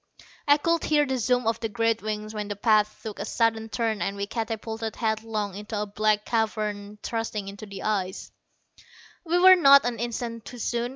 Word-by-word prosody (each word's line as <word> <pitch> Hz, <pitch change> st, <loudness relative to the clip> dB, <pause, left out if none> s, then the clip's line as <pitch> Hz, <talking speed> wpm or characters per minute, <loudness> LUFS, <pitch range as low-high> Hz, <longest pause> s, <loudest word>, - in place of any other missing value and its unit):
I 290 Hz, 0 st, +6 dB
could 335 Hz, +2 st, 0 dB
hear 295 Hz, -1 st, +3 dB
the 265 Hz, -2 st, -2 dB
zoom 245 Hz, +1 st, +1 dB
of 225 Hz, 0 st, 0 dB
the 225 Hz, -1 st, -3 dB
great 230 Hz, 0 st, 0 dB
wings 215 Hz, 0 st, -4 dB
when 210 Hz, -1 st, -4 dB
the 205 Hz, -, -4 dB
path 215 Hz, 0 st, +2 dB
took 215 Hz, -2 st, -6 dB
a -, -, -2 dB
sudden 225 Hz, -1 st, 0 dB
turn 225 Hz, -2 st, -1 dB
and 200 Hz, 0 st, -2 dB
we 200 Hz, -, -2 dB
catapulted 225 Hz, 0 st, -4 dB
headlong 220 Hz, -2 st, -2 dB
into 210 Hz, +2 st, -5 dB
a 210 Hz, -, -1 dB
black 210 Hz, +1 st, 0 dB
cavern 210 Hz, -2 st, -2 dB
thrusting 225 Hz, -3 st, -3 dB
into 200 Hz, +2 st, -8 dB
the 200 Hz, -1 st, -8 dB
ice. 190 Hz, -3 st, -2 dB, 1.0 s
We 340 Hz, +2 st, +2 dB
were 370 Hz, +1 st, +9 dB
not 280 Hz, -6 st, +7 dB
an 245 Hz, -2 st, -2 dB
instant 235 Hz, -1 st, -4 dB
too 245 Hz, -, -9 dB
soon. 235 Hz, +1 st, -2 dB
220 Hz, 190 wpm, -26 LUFS, 210-235 Hz, 1.0 s, were